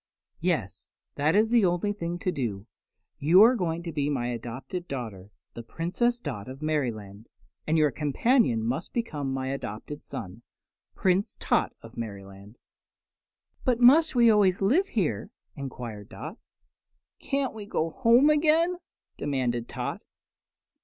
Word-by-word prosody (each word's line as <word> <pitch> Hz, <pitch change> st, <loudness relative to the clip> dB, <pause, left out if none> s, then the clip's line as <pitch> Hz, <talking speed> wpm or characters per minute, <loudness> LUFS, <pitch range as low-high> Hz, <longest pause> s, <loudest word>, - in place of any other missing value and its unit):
"Yes, -, -, -2 dB, 0.2 s
that 150 Hz, +4 st, +1 dB
is 220 Hz, +2 st, +3 dB
the 235 Hz, -3 st, +5 dB
only 180 Hz, +3 st, +1 dB
thing 175 Hz, -3 st, -4 dB
to 185 Hz, -, -1 dB
do. 105 Hz, -, -3 dB, 0.5 s
You 170 Hz, +8 st, +7 dB
are 235 Hz, +3 st, +7 dB
going 170 Hz, -5 st, -2 dB
to 170 Hz, -, -5 dB
be 145 Hz, -2 st, -1 dB
my 125 Hz, -4 st, -1 dB
adopted 125 Hz, +9 st, -6 dB
daughter, 110 Hz, -8 st, -6 dB, 0.2 s
the 120 Hz, -, -7 dB
Princess 180 Hz, -, -1 dB
Dot 105 Hz, -, -6 dB
of 130 Hz, +1 st, -8 dB
Merryland; 115 Hz, -9 st, -3 dB, 0.4 s
and 160 Hz, +1 st, +2 dB
your 150 Hz, -2 st, +4 dB
companion 150 Hz, -, +2 dB
must 130 Hz, +9 st, -3 dB
become 150 Hz, -, -2 dB
my 130 Hz, 0 st, -2 dB
adopted 135 Hz, +2 st, -6 dB
son, 100 Hz, +2 st, -8 dB, 0.5 s
Prince 190 Hz, +2 st, +1 dB
Tot -, -, +1 dB
of 115 Hz, +1 st, -13 dB
Merryland." 100 Hz, -1 st, -8 dB, 1.1 s
"But 245 Hz, -2 st, +1 dB
must 285 Hz, +5 st, +6 dB
we 235 Hz, -2 st, +6 dB
always 195 Hz, -3 st, +3 dB
live 280 Hz, -, +3 dB
here?" 150 Hz, -, -1 dB, 0.3 s
enquired 120 Hz, -6 st, -7 dB
Dot. 160 Hz, -, -8 dB, 0.8 s
"Can't 275 Hz, -1 st, -1 dB
we 210 Hz, -2 st, -8 dB
go 165 Hz, -5 st, -1 dB
home 260 Hz, +4 st, +5 dB
again?" 320 Hz, +4 st, +3 dB, 0.4 s
demanded 125 Hz, -4 st, -1 dB
Tot. -, -, -4 dB
155 Hz, 140 wpm, -27 LUFS, -, 1.1 s, You